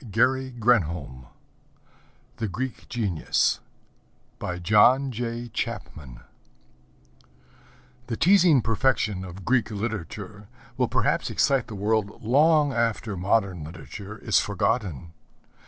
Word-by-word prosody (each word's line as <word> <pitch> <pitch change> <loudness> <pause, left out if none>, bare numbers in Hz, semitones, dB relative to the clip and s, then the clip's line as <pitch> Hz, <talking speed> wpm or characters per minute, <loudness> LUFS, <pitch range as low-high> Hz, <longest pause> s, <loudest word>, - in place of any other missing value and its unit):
_' 110 - 0 1.1
The 110 - -2
Greek 125 +6 -5
Genius 100 -9 0 0.8
By 90 -1 -4
John 115 +9 +4
Jay 120 0 -4
Chapman 80 - -6 1.9
The 115 - -3
teasing 175 - +5
perfection 110 -4 0
of 95 0 -9
Greek 125 -3 +2
Literature 105 -1 -5 0.3
will 125 -1 +1
perhaps - - 0
excite 135 -4 +1
the 110 - -7
world 105 +1 -1
long 145 +4 +4
after 115 -3 -1
modern 95 -2 0
literature 90 +7 -9
is - - +2
forgotten. 85 - -2
110 Hz, 95 wpm, -25 LUFS, 95-125 Hz, 1.9 s, teasing